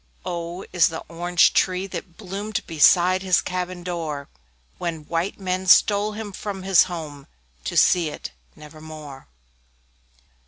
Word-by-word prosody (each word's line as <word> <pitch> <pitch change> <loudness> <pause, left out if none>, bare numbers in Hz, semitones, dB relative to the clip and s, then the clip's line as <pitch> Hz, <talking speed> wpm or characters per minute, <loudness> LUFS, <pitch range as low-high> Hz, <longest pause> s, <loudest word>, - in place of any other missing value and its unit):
O 175 0 -4
O - - -10
is 180 - +5
the 160 - -5
Orange 175 +1 +3
tree, 185 0 +1
that 185 -3 -8
bloomed 200 +3 -4
Beside 175 +3 +4
his 185 -2 +3
cabin 180 -1 -4
door, 160 -5 -4 0.5
When 165 -3 -4
white 170 +6 -2
men 185 0 -2
stole 205 +2 +5
him 210 -1 -6
from 195 0 -6
his 190 -2 +5
home 155 -6 -7 0.4
To - - -3
see 170 -3 +4
it - - -8 0.2
never 155 +1 -13
more. 155 - -10
175 Hz, 145 wpm, -23 LUFS, 165-185 Hz, 0.5 s, is